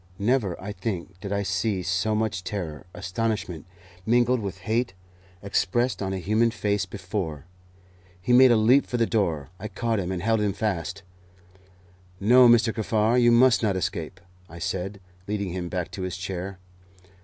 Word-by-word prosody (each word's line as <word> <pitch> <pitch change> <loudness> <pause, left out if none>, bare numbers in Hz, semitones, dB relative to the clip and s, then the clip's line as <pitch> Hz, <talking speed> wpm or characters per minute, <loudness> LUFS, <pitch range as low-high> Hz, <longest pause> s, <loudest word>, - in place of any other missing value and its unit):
Never, 105 -4 0
I 105 - -6
think, 95 -2 -5
did 100 +2 -6
I 100 0 0
see 95 0 -1
so 95 +4 0
much 105 -4 -1
terror, 90 -5 -5
astonishment, 95 -5 -3 0.4
mingled 120 +3 +3
with 100 -4 -6
hate, 115 -2 0 0.5
expressed 120 +5 0
on 95 -1 -2
a 95 - -2
human 110 +5 +2
face 105 -4 -1
before. 95 -6 -5 0.7
He 120 +7 0
made 130 +1 +8
a 120 - +5
leap 120 +6 +4
for 120 - -2
the 115 - +3
door. 85 -11 -1
I 105 - -5
caught 115 +1 -1
him, 90 -1 -3
and 90 -1 -3
held 110 0 +2
him 105 -2 +1
fast. 100 -2 -3 1.2
"No, 125 +4 +6
Mr. 115 -1 +4
Kaffar, 110 +2 +2
you 120 0 +5
must 120 +1 +5
not 105 -4 +1
escape," 90 -1 -3 0.3
I 85 - -10
said, 95 +2 -3 0.3
leading 100 -3 -2
him 90 -1 -4
back 90 -2 -3
to 95 - -6
his 90 -1 -3
chair. 95 +1 -5
100 Hz, 165 wpm, -25 LUFS, 95-115 Hz, 1.2 s, made